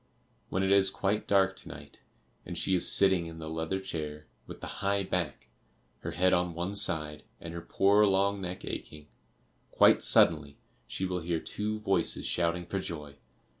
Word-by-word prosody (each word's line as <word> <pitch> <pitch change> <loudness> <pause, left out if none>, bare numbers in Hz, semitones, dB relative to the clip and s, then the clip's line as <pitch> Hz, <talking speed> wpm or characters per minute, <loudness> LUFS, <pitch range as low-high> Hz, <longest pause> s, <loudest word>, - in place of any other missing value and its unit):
When 95 - -1
it 95 - +1
is 100 -1 +5
quite 105 +2 -2
dark 95 -1 +3
to - - -12
night, - - -12 0.4
and - - -7
she 95 - 0
is 90 - +5
sitting 95 -4 +4
in 80 0 -9
the 80 -1 -7
leather 80 +4 -2
chair 75 -5 -6 0.2
with - - -10
the - - -7 0.2
high 100 0 +1
back, 90 -8 -3 0.5
her - - -6
head 90 +1 +2
on 90 -1 0
one 90 +4 -3
side, 75 -6 -2 0.2
and 85 - -8
her 85 - -6
poor 100 +4 +3
long 100 +1 +1
neck 90 0 -6
aching, 75 -1 -8 0.6
quite - - +5
suddenly 75 -4 +3 0.3
she 95 - -3
will 90 -1 -2
hear 85 0 -2
two 105 +5 -4
voices 95 -5 0
shouting 85 0 -1
for 95 +3 -3
joy. 75 -5 -7
90 Hz, 175 wpm, -29 LUFS, 80-95 Hz, 0.6 s, is